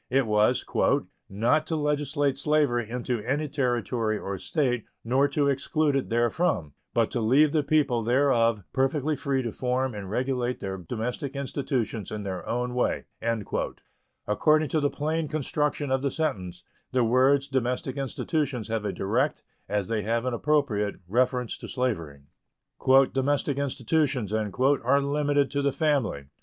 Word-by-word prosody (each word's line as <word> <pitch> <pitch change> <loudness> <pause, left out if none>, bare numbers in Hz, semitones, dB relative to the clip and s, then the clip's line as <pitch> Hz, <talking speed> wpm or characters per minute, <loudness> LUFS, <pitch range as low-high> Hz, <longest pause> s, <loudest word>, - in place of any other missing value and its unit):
It 135 +1 +2
was 105 -1 +2 0.6
"not 120 +10 +1
to 165 - -1
legislate 145 -2 0
slavery 140 -5 +1
into 125 -1 -2
any 145 +7 -1
Territory 120 -5 0
or 100 -1 -4
State, 125 -7 0 0.2
nor 130 +5 +3
to 145 0 +1
exclude 140 +2 +1
it 135 - -1
therefrom, 120 - +1 0.2
but 115 -2 +1
to 120 - -1
leave 140 +7 +4
the 155 -1 +2
people 140 -5 +2
thereof 115 -3 +2
perfectly 140 +3 +1
free 135 -3 -1
to 115 - -3
form 130 +2 -1
and 100 -2 -6
regulate 125 +2 -1
their 95 -1 -4
domestic 120 - -4
institutions 130 -6 -2
in 105 -1 -5
their 95 -2 -4
own 125 +1 -1
way." 125 - 0 1.2
According 155 +8 +3
to 155 - +1
the 145 -1 +2
plain 155 +2 -2
construction 150 -1 -1
of 130 0 +2
the 140 - +1
sentence, 95 - -3 0.3
the 130 -1 +2
words 130 +4 +3
"domestic 130 +2 -1
institutions" 135 -3 -2
have 110 -2 -2
a - - 0
direct, 120 +10 0 0.3
as 105 -2 0
they 110 -2 -1
have 115 +3 -1
an 130 - -1
appropriate, 120 -6 +1
reference 125 +3 0
to - - -8
slavery. 85 - -2 0.9
"Domestic 140 +1 0
institutions" 135 -4 0
are 130 +6 +2
limited 145 0 +1
to 140 0 0
the 140 0 +2
family. 135 - 0
130 Hz, 150 wpm, -27 LUFS, 115-145 Hz, 1.2 s, leave